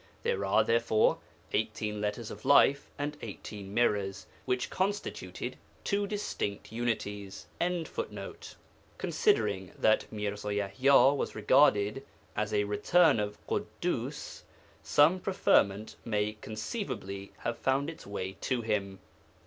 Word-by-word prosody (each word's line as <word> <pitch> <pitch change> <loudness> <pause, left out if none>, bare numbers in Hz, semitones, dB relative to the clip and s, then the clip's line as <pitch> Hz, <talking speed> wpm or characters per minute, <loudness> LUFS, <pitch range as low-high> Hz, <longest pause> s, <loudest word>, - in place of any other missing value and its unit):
There 95 - 0
are, 95 - +4
therefore, 115 -2 +3 0.3
18 105 -1 -1
Letters 105 +2 -3
of 105 - -9
Life 140 0 +5
and 145 +1 -3
18 100 -2 -7
Mirrors, 100 -3 +1 0.2
which 125 0 -1
constituted 200 +2 -3 0.3
two 200 0 0
distinct 195 - -3
Unities.'] 105 -4 -3
Considering 175 -1 0 1.9
that 110 - +2
Mirza 105 -1 -4
Yaḥya 130 +8 +4
was - - -3
regarded 110 0 +4 0.3
as 105 +1 -1
a 105 -1 +2
'return' 125 +8 +4
of 105 0 -2
Ḳuddus, - - -3 0.4
some 160 +6 +4
preferment 110 - +2
may 105 -1 -1
conceivably 110 - -5
have 120 - -3
found 135 +2 +1
its 165 -9 -8
way 95 -1 -4
to 125 -3 +1
him. 100 -3 -1
110 Hz, 110 wpm, -30 LUFS, 105-140 Hz, 1.9 s, Life